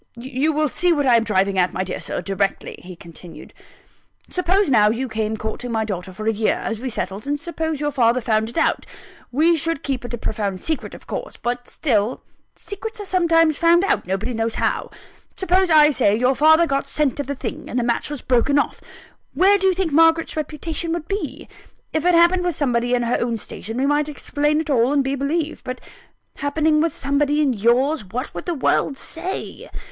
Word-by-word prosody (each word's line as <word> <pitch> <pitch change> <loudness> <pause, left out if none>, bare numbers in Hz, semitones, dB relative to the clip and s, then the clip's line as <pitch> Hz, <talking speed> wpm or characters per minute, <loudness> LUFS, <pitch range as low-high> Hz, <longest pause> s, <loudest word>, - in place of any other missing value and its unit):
"You 265 +5 -1
will 305 0 +1
see 355 +6 +1
what 290 -4 +1
I 250 -2 +5
am 230 - +1
driving 195 -3 +1
at, 180 0 +2
my 185 - -1
dear 185 - -5
Sir, - - -4
directly," 195 0 -2
he 180 0 -11
continued. 170 0 -12 0.8
"Suppose 370 +3 +2
now, 210 -4 +5
you 240 +4 -2
came 220 -1 -2
courting 220 +3 -5
my 220 -1 0
daughter 190 -3 -5
for 215 +4 -8
a 225 - +2
year, 215 +1 +1
as 225 -2 -4
we 260 +2 -4
settled; 210 +1 -4
and 290 0 -1
suppose 320 -2 -3
your 295 0 -1
father 245 -3 +2
found 220 -2 0
it 235 - -9
out - - +1 0.4
we 320 +6 +3
should 330 -1 -1
keep 265 -3 -2
it 240 - -7
a - - -9
profound 205 -4 -3
secret 315 - -3
of - - -14
course: - - -6
but 245 +1 -3
still, 230 -5 -1 0.3
secrets 435 +2 -8
are 410 - -6
sometimes 330 -4 +3
found 340 +2 +4
out, 395 - +1
nobody 200 +6 -2
knows 225 0 -1
how. - - -1 0.5
Suppose, 375 0 +2
I 305 -1 +6
say, 210 -7 +2
your 250 +4 +2
father 315 +4 +5
got 275 -2 -1
scent 290 -1 0
of 285 - -3
the 280 - -3
thing, - - -6
and - - -3
the 245 - +1
match 235 +3 -1
was 295 -3 -6
broken 260 +3 +2
off; 285 - -1 0.5
where 390 +6 +5
do 385 - +2
you 380 - +4
think 365 -3 -1
Margaret's 325 +2 +3
reputation 315 +2 -3
would 335 -1 -4
be? 400 +1 -4 0.5
If 315 +1 -1
it 355 -1 +4
happened 345 +2 +4
with 350 -3 -1
somebody 245 -3 +1
in 240 - 0
her 235 +1 0
own 235 -1 -1
station, 225 +1 -7
we 265 - +1
might 290 +1 +1
explain 295 +1 -1
it 315 - -8
all, 250 +1 +3
and 285 -1 +2
be 270 +1 -1
believed: 300 +3 -2
but 255 0 -5 0.6
happening 305 +2 +1
with 330 0 +1
somebody 285 +2 0
in 285 -4 +2
yours, 245 +6 +2
what 235 +9 -5
would - - -7
the 345 - -1
world 275 0 +1
say? 350 +7 -6
275 Hz, 210 wpm, -21 LUFS, 230-320 Hz, 0.8 s, I